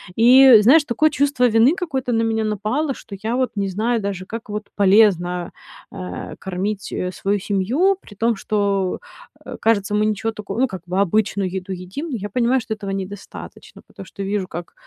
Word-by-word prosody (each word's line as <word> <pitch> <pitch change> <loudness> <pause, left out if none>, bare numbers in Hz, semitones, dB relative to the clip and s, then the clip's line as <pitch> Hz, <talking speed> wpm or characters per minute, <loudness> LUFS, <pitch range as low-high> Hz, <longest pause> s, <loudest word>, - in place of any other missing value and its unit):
И, 250 0 +8
знаешь, 280 +9 +6
такое 295 +6 +2
чувство 280 -3 +1
вины 235 +7 +4
какое-то 265 -9 -3
на 225 - +2
меня 225 -1 0
напало, 215 +8 -1
что 210 -5 -10
я 225 +3 -2
вот 255 -3 0
не 200 -1 -1
знаю 225 +4 -1
даже, 195 -2 -4
как 225 +2 -8
вот 210 +1 -4
полезно, 190 -4 +3 0.4
а, 185 -2 -7
кормить, 190 +2 -4
э, 180 - -2
свою 200 +2 -1
семью, 240 - +1
при 205 - -15
том, 225 +2 +1
что, 200 -2 -1 0.5
э, - - -7
кажется, 205 -3 +1
мы 210 0 +2
ничего 215 +1 -1
тако 210 -2 -7
ну, 265 - +3
как 190 -5 -8
бы 185 +2 -1
обычную 200 0 0
еду 190 0 -5
едим, 185 - -6
но - - -2
я 205 +1 -6
понимаю, 245 +4 +1
что 220 - -4
этого 200 -2 -6
недостаточно. 195 +1 -8
Потому - - -11
что 200 - -8
вижу, 195 -1 -2
как 175 -1 -8
210 Hz, 190 wpm, -20 LUFS, 195-235 Hz, 0.5 s, И